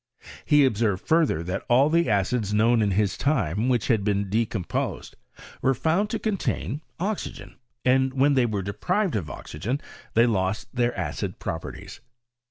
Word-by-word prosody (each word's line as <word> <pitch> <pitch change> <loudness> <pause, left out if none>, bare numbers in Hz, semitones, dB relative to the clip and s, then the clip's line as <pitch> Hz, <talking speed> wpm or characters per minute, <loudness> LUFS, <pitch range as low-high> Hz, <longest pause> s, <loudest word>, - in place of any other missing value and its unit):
He 150 -1 +5
observed 110 -6 0
further, 160 - +2
that 95 +4 -3
all 130 +4 +5
the 170 -1 +2
acids 105 +1 +1
known 115 +2 +4
b 105 -2 +2
his 100 0 +1
time 115 - 0
which 120 -4 +1
had 110 -5 +2
been 100 -1 0
decomposed 110 -4 -2 0.5
were 135 0 +2
found 170 - +1
to 225 - -1
contain 195 -8 -2 0.2
oxygen, 200 +3 -4 0.3
and 130 +1 +3
when 135 +2 +3
they 130 -3 +3
were 105 -3 -2
deprived 180 - -1
of 90 -8 -2
oxygen, 100 - -4 0.4
they 115 +1 +6
lost 105 0 -1
their 120 -1 0
acid 95 -3 -3
properties. 80 +2 -6
115 Hz, 155 wpm, -25 LUFS, 100-140 Hz, 0.5 s, they